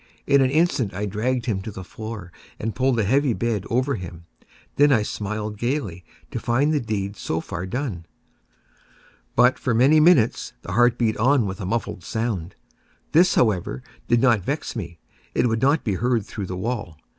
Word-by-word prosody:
In 140 0 +4
an 130 - +3
instant 140 - +1
I 100 +2 -2
dragged 115 +5 -1
him 105 -5 -1
to 105 - -6
the 95 -2 -8
floor, 110 -2 -8 0.3
and 110 0 -3
pulled 130 +1 +1
the 110 - +1
heavy 135 +5 +2
bed 110 -4 -1
over 130 +4 +1
him. 85 -5 -7 0.2
I - - -29 0.3
then 140 -7 +4
smiled 105 0 -4
gaily, 120 - -2 0.3
to - - -3
find 135 +7 +1
the 150 - +2
deed 105 -4 -3
so 80 - -2
far 85 +2 -5
done. 100 - -4 1.3
But, 125 +2 +4
for 130 -6 0
many 135 +7 +5
minutes, 150 -8 +3
the - - -6
heart 120 +4 +4
beat 110 -3 +1
on 125 +1 +3
with 95 +2 -5
a 90 - -4
muffled 110 -4 -3
sound. 105 -5 -3 0.6
This, 175 +3 +5
however, 90 - +1 0.2
did 120 -1 +3
not 120 -6 +4
vex 140 - -3
me; 85 -7 -6 0.4
it - - +3
would 115 -1 0
not 140 +4 +3
be 105 - 0
heard 115 +1 0
through 105 -4 -6
the 90 - -5
wall. 105 -6 -4
115 Hz, 185 wpm, -23 LUFS, 100-130 Hz, 1.3 s, many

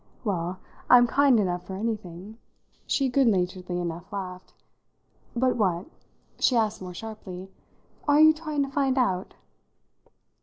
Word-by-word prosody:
"Well, 185 -4 -2 0.3
I'm 245 -1 +8
kind 270 -1 +4
enough 180 -3 -1
for 190 - -5
anything," 210 -1 -5 0.5
she 275 - +1
goodnaturedly 185 -8 +1
enough 175 +3 -5
laughed. 185 -2 -6 0.8
"But 250 +1 +2
what," 180 -5 +1 0.5
she 255 - +3
asked 220 -3 +1
more 180 -1 -7
sharply, 195 -3 -8 0.6
"are 290 0 +5
you 315 0 +8
trying 310 -2 -2
to 275 - -4
find 275 -2 +1
out?" 190 -8 0
210 Hz, 125 wpm, -26 LUFS, 180-255 Hz, 0.8 s, I'm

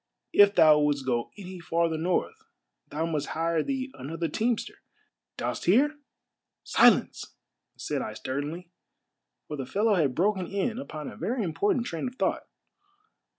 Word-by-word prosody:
If 205 0 +6
thou 155 -1 +7
wouldst 145 -2 +1
go 120 -2 -1
any 185 -2 -8
farther 165 -1 0
north 170 +3 0 0.5
thou 155 +3 -2
must 155 -3 -2
hire 165 0 +1
thee 265 - -3
another 165 +6 -4
teamster; 225 +8 -2 0.6
dost - - -3
hear?" 285 - +3 0.4
" - - -61
Silence! - - +4 0.2
" - - -58
said 145 -3 -3
I 110 - -5
sternly, 150 +9 -5 0.8
for 150 - -5
the 135 -2 -5
fellow 210 - +2
had 150 -9 +1
broken 190 0 +1
in 210 +4 -2
upon 155 - -7
a - - -8
very 225 +6 -2
important 200 +8 0
train 165 +1 -3
of 250 - -7
thought. - - -1
170 Hz, 150 wpm, -27 LUFS, 150-205 Hz, 0.8 s, thou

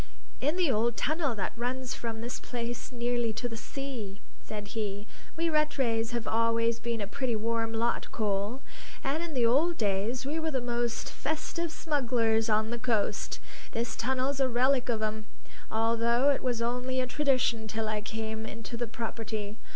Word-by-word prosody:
"In 295 +5 +2
the 355 -6 +3
old 230 +1 +2
tunnel 305 -5 +1
that 190 -3 -2
runs 250 +2 -2
from 225 -1 -4
this 240 +1 -3
place 240 0 -4
nearly 240 -1 +1
to 245 - -2
the 230 - -5
sea," 225 -4 -5 0.2
said 210 -1 -6
he. 210 -2 -3 0.3
"We 335 +1 +2
Rattrays 270 -8 +2
have 235 -2 -2
always 230 0 +3
been 230 -1 -2
a - - 0
pretty 245 +3 -1
warm 225 +1 0
lot, 230 +1 0
Cole, 210 +4 -1 0.4
and 280 +4 0
in 335 -3 -4
the 245 -2 +4
old 310 +9 +4
days 210 +5 0
we 300 +4 0
were 320 0 0
the 270 -4 +1
most 240 -1 -1
festive 315 +2 -2
smugglers 235 -8 +2
on 215 +1 +3
the 240 - -2
coast; 225 -4 0 0.3
this 230 +1 -1
tunnel's 265 +3 0
a 265 -1 +4
relic 255 +1 +3
of 220 -2 +1
'em, 215 0 -2 0.4
although 230 +4 +3
it 280 - 0
was 240 -3 0
only 250 +2 0
a 255 - +2
tradition 255 -5 +2
till 220 +1 -1
I 215 -1 0
came 220 +1 -3
into 225 +2 -6
the 240 0 -1
property. 220 -2 -4
235 Hz, 175 wpm, -30 LUFS, 225-260 Hz, 0.4 s, the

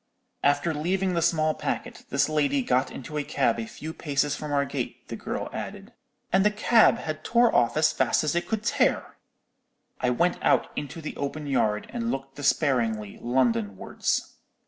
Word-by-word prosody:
After 145 +4 +2
leaving 180 +5 0
the 170 - +1
small 155 -2 +2
packet, - - -4
this - - +2
lady 145 -3 +1
got 125 +2 +1
into 150 +3 -6
a - - -1
cab 130 -5 +1
a 110 - -4
few 160 +6 -7
paces 145 -2 0
from 150 -1 -6
our 140 -1 +2
gate, - - -5
the - - -4
girl - - -4
added, - - -7 0.4
'and 190 0 +5
the 210 - +5
cab 215 +2 +4
had 155 0 -5
tore 235 0 +3
off 120 - +3
as 155 - +3
fast - - +2
as 150 - 0
it 175 0 -1
could 220 -1 -2
tear!' - - +1 0.8
"I 125 - +1
went 170 +9 +1
out - - +3
into 145 +3 -5
the 155 - -6
open 145 +2 -4
yard, 110 -7 +1
and 235 -1 -2
looked 135 -4 -4
despairingly 120 -8 0
London 115 -5 +1
wards. - - -2
145 Hz, 180 wpm, -26 LUFS, 130-170 Hz, 0.8 s, and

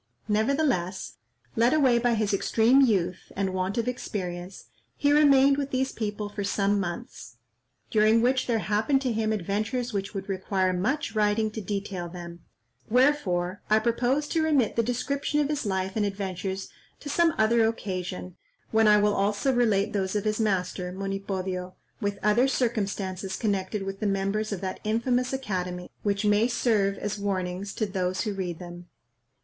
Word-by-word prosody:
Nevertheless, 215 - 0 0.4
led 235 +6 +4
away 260 -6 +4
by 240 0 +2
his 215 -2 0
extreme 230 +6 +4
youth, 185 -8 +1
and 190 -1 -1
want 185 +2 -2
of 235 0 0
experience, 185 -7 -5 0.3
he 285 0 +3
remained 280 -2 +6
with 280 -1 -2
these 265 0 0
people 210 -1 -3
for 205 0 -5
some 200 0 +1
months, 150 - -6 0.5
during 215 +1 +4
which 255 +2 +2
there 235 -2 +2
happened 215 +7 +1
to 250 -3 0
him 220 0 0
adventures 215 +5 -2
which 200 +1 -3
would 195 0 -4
require 190 -1 0
much 255 +12 -1
writing 215 0 +1
to 220 - -5
detail 195 -3 -4
them; 170 -1 -9 0.5
wherefore 205 -8 +2
I 215 - +5
propose 245 +6 +1
to 325 - +1
remit 290 -8 +2
the 230 - +3
description 275 +5 -1
of 295 -1 +1
his 295 -7 -2
life 190 -1 -1
and 215 - +1
adventures 195 -1 -3 0.3
to - - -10
some 330 +2 +2
other 225 +1 +4
occasion, 185 -4 -4 0.3
when 220 0 +4
I 210 0 +7
will 210 0 +3
also 205 +7 +1
relate 220 -5 +2
those 190 -1 -1
of 205 - 0
his 215 +1 0
master, 180 -3 -1
Monipodio, 190 -1 -4 0.2
with 205 -3 -2
other 215 +5 +4
circumstances 200 -7 -1
connected 200 -1 -1
with 195 0 -5
the 215 - 0
members 195 +2 -1
of 200 - -3
that 190 -1 -4
infamous 245 +3 0
academy, 180 -9 -3
which 200 0 0
may 210 +2 +4
serve 215 -5 +1
as 205 0 -4
warnings 190 -1 -2
to 215 - 0
those 185 -2 -1
who 210 - -2
read 180 -4 -4
them. 175 0 -10
210 Hz, 165 wpm, -27 LUFS, 190-235 Hz, 0.5 s, I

